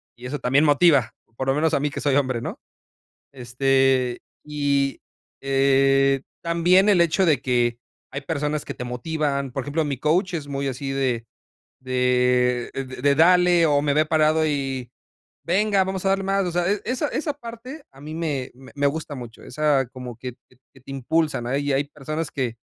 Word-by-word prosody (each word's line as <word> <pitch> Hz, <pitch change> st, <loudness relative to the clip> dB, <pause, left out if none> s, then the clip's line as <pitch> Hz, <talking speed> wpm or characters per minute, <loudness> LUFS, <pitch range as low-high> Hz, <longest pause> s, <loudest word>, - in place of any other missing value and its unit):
y 120 Hz, -, -12 dB
eso 140 Hz, +3 st, -4 dB
también 135 Hz, +4 st, +2 dB
motiva, 145 Hz, -5 st, +4 dB, 0.2 s
por 130 Hz, -, -3 dB
lo 135 Hz, -, +3 dB
menos 160 Hz, +2 st, +1 dB
a -, -, +1 dB
mí 150 Hz, +2 st, 0 dB
que -, -, -5 dB
soy 140 Hz, -2 st, +1 dB
hombre, 130 Hz, -4 st, 0 dB
¿no?, -, -, -6 dB, 0.7 s
este, 130 Hz, 0 st, +1 dB, 0.2 s
y 140 Hz, -2 st, 0 dB, 0.4 s
eh, 135 Hz, 0 st, +3 dB, 0.2 s
también 175 Hz, +4 st, +3 dB
el 195 Hz, -4 st, +4 dB
hecho 170 Hz, +3 st, +2 dB
de 150 Hz, -7 st, +2 dB
que 120 Hz, -2 st, 0 dB, 0.3 s
hay 140 Hz, -, -5 dB
personas 150 Hz, 0 st, -2 dB
que -, -, -5 dB
te -, -, -7 dB
motivan, 140 Hz, +1 st, -2 dB
por 135 Hz, +1 st, -4 dB
ejemplo, 145 Hz, +4 st, -1 dB
mi 140 Hz, -3 st, -3 dB
coach 175 Hz, +7 st, +1 dB
es 145 Hz, -3 st, -5 dB
muy 140 Hz, 0 st, -3 dB
así 135 Hz, +1 st, -4 dB
de 130 Hz, -4 st, -1 dB, 0.5 s
de 125 Hz, -1 st, +1 dB, 0.3 s
de: 140 Hz, +1 st, +3 dB
"Dale" 175 Hz, +1 st, +5 dB
o 145 Hz, -1 st, +3 dB
me 145 Hz, -1 st, +1 dB
ve 155 Hz, +2 st, +3 dB
parado 155 Hz, 0 st, +2 dB
y: 135 Hz, -4 st, -2 dB, 0.5 s
"Venga, 195 Hz, +2 st, +2 dB
vamos 190 Hz, 0 st, -4 dB
a -, -, +3 dB
darle 195 Hz, 0 st, +1 dB
más", 195 Hz, 0 st, +1 dB
o 175 Hz, -, -2 dB
sea, 175 Hz, +1 st, 0 dB, 0.2 s
esa 255 Hz, +4 st, -1 dB
esa 300 Hz, -1 st, -2 dB
parte 250 Hz, +3 st, -10 dB
a 135 Hz, -, -18 dB
mí 155 Hz, +2 st, -8 dB
me 150 Hz, -6 st, -3 dB
me 135 Hz, +3 st, -3 dB
gusta 155 Hz, +1 st, -4 dB
mucho, 120 Hz, -3 st, -10 dB
esa 140 Hz, -2 st, +1 dB
como 125 Hz, -2 st, -9 dB
que 125 Hz, 0 st, -7 dB, 0.4 s
que 135 Hz, -, -18 dB
te 135 Hz, -, -11 dB
impulsan, 135 Hz, -1 st, -1 dB
hay 140 Hz, +2 st, -1 dB
hay 135 Hz, -, +2 dB
personas 150 Hz, +2 st, -5 dB
que 125 Hz, -4 st, -3 dB
140 Hz, 180 wpm, -23 LUFS, 130-160 Hz, 0.7 s, Dale